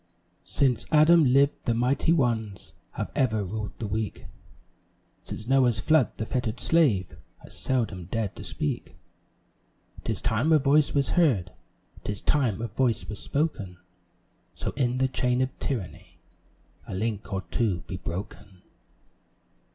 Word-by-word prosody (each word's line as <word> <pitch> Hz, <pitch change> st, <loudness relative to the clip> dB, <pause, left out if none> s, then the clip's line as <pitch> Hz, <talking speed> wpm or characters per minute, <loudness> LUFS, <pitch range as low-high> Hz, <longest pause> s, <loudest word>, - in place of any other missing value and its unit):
Since 130 Hz, -5 st, +1 dB
Adam 155 Hz, +1 st, +6 dB
lived, 140 Hz, +3 st, +3 dB
the 115 Hz, -, +1 dB
mighty 125 Hz, +7 st, +2 dB
ones 115 Hz, -, 0 dB, 0.2 s
Have -, -, -4 dB
ever 110 Hz, -5 st, +1 dB
ruled 105 Hz, +2 st, -5 dB
the 115 Hz, -, -4 dB
weak; 110 Hz, +1 st, -3 dB, 1.0 s
Since 105 Hz, -, -8 dB
Noah's 125 Hz, -3 st, +3 dB
flood, 155 Hz, +3 st, +2 dB
the 110 Hz, -, -2 dB
fettered 125 Hz, 0 st, -2 dB
slave 125 Hz, -, +2 dB, 0.2 s
Has -, -, -12 dB
seldom 110 Hz, -9 st, -1 dB
dared 105 Hz, +2 st, -3 dB
to -, -, -7 dB
speak. 75 Hz, -, -4 dB, 1.1 s
'Tis -, -, -2 dB
time 120 Hz, +9 st, +1 dB
a 160 Hz, -, +7 dB
voice 145 Hz, +1 st, +3 dB
was 140 Hz, -1 st, +1 dB
heard, 120 Hz, -, +2 dB, 0.5 s
'Tis 105 Hz, -2 st, -4 dB
time 120 Hz, -7 st, +1 dB
a -, -, -1 dB
voice 115 Hz, +1 st, 0 dB
was 105 Hz, -, -6 dB
spoken 125 Hz, -, -2 dB, 0.8 s
So -, -, -3 dB
in 125 Hz, -2 st, 0 dB
the 130 Hz, 0 st, +2 dB
chain 125 Hz, -1 st, 0 dB
of 130 Hz, 0 st, -1 dB
tyranny 115 Hz, -10 st, -5 dB, 0.7 s
A -, -, -5 dB
link 110 Hz, +1 st, -3 dB
or 95 Hz, -1 st, -2 dB
two 100 Hz, -8 st, 0 dB
be 90 Hz, +2 st, -6 dB
broken. 95 Hz, +1 st, -7 dB
120 Hz, 140 wpm, -27 LUFS, 105-135 Hz, 1.1 s, a